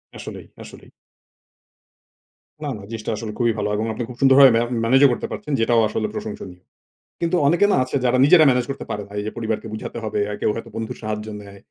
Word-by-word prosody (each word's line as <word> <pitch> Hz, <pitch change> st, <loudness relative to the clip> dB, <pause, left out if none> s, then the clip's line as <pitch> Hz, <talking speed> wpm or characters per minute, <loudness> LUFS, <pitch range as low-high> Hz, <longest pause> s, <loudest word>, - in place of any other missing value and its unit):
আসলেই, -, -, -9 dB, 0.2 s
আসলেই। -, -, -14 dB, 1.7 s
না, 145 Hz, -, -3 dB
না। 105 Hz, -, -11 dB
জিনিসটা 115 Hz, -1 st, -5 dB
আসলে 110 Hz, -1 st, -5 dB
খুবই 120 Hz, -1 st, +3 dB
ভালো 105 Hz, 0 st, -1 dB
এবং 110 Hz, -, -1 dB
আপনি 120 Hz, -, -4 dB
খুব 125 Hz, -, -8 dB
সুন্দরভাবে 135 Hz, 0 st, +8 dB
মে -, -, +2 dB, 0.2 s
ম্যানেজও 135 Hz, +3 st, +5 dB
করতে -, -, -3 dB
পারছেন, 150 Hz, -, -6 dB
যেটাও 115 Hz, 0 st, +3 dB
আসলে 110 Hz, 0 st, -2 dB
প্রশংসনীয়। 95 Hz, -5 st, -7 dB, 0.6 s
কিন্তু 170 Hz, +1 st, +1 dB
অনেকে 170 Hz, +6 st, +4 dB
না -, -, +3 dB
আছে 130 Hz, -, -5 dB
যারা 125 Hz, +1 st, +3 dB
নিজেরা 155 Hz, +1 st, +7 dB
ম্যানেজ 125 Hz, -1 st, +1 dB
করতে -, -, -7 dB
পারে 105 Hz, -, -4 dB
না। -, -, -20 dB
এইযে 105 Hz, +1 st, -4 dB
পরিবারকে 110 Hz, 0 st, -3 dB
বুঝাতে 110 Hz, -, -6 dB
হবে, 110 Hz, -1 st, -2 dB
আর 105 Hz, -, -3 dB
কেউ -, -, +2 dB
হয়তো 115 Hz, 0 st, -7 dB
বন্ধুর 110 Hz, -1 st, -5 dB
সাহায্য 105 Hz, 0 st, -4 dB
নেয়, 100 Hz, -1 st, -13 dB
115 Hz, 200 wpm, -21 LUFS, 105-130 Hz, 1.7 s, সুন্দরভাবে